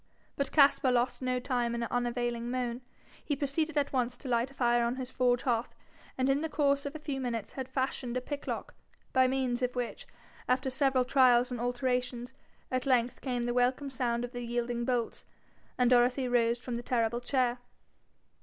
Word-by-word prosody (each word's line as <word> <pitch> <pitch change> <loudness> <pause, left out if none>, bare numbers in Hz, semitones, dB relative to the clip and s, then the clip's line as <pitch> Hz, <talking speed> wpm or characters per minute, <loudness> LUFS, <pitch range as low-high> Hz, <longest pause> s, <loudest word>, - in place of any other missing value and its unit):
But 280 - -2
Caspar 275 -3 +5
lost 245 +1 +1
no 255 -1 0
time 245 -2 -1
in 235 - -2
unavailing 240 0 -1
moan. 245 -1 -2 0.4
He 290 - -1
proceeded 300 +3 -1
at 285 -1 +1
once 250 -1 0
to 270 - -10
light 240 +1 +1
a - - -16
fire 240 -2 +3
on 235 +1 0
his 260 -1 -6
forge 245 -1 +2
hearth, 235 -2 -1 0.4
and 260 0 +1
in 275 +1 +2
the 320 - -2
course 280 -1 +1
of 285 - -7
a - - -2
few 285 -3 -4
minutes 235 -4 -3
had 265 -1 -5
fashioned 260 -2 -2
a - - +1
pick 285 +3 -6
lock, - - -4 0.4
by 260 0 +5
means 260 -1 0
of 250 0 -1
which, 245 -1 -4 0.4
after 260 +1 +1
several 265 -1 +2
trials 255 -1 +4
and 245 -2 -3
alterations, 245 0 -1 0.4
at 255 +1 -1
length 250 -2 +2
came 245 -3 -2
the 240 0 -1
welcome 255 +3 +1
sound 245 -2 -1
of 245 - -10
the 245 - -5
yielding 240 0 -2
bolts, 245 -2 -1 0.5
and 250 0 +3
Dorothy 250 +1 +4
rose 235 -1 +2
from 245 -1 -5
the - - -4
terrible 235 -1 0
chair. 250 -1 +1
250 Hz, 190 wpm, -30 LUFS, 240-265 Hz, 0.5 s, Caspar